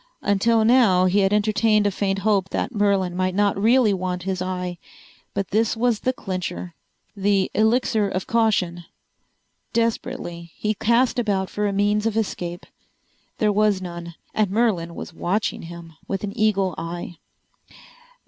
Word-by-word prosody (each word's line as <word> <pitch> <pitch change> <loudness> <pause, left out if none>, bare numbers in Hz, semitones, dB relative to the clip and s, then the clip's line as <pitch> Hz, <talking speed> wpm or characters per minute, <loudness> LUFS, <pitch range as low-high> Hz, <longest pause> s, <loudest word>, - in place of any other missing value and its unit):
Until 220 +3 +3
now 220 -7 +5
he 185 +2 +3
had 195 -1 +3
entertained 210 0 +2
a 205 - +2
faint 195 0 -1
hope 200 -3 +2
that 255 - -2
Merlin 200 -4 +1
might 185 0 0
not 205 0 +2
really 225 +1 +4
want 180 -1 -3
his 190 -1 -2
eye. 180 -1 -3 0.6
But 195 - -2
this 225 +2 +1
was 235 -2 +1
the 255 - 0
clincher. 185 -6 -5 0.4
The 200 -1 +1
Elixir 220 -1 +2
of 185 - -3
Caution! 190 -7 +1 0.9
Desperately 175 -7 -2
he 215 0 -1
cast 235 +4 +2
about 195 -5 -1
for 210 0 -1
a - - 0
means 205 +2 +1
of 225 -1 -1
escape. 175 -5 -3 0.7
There 210 -2 +2
was 210 -1 +2
none. 170 -2 -7 0.2
And 215 -3 +1
Merlin 190 -6 0
was - - -7
watching 195 +6 -1
him 170 -1 -10
with 195 0 -3
an 200 -1 -4
eagle 200 -4 +1
eye. 170 +1 -6
200 Hz, 150 wpm, -23 LUFS, 180-215 Hz, 0.9 s, now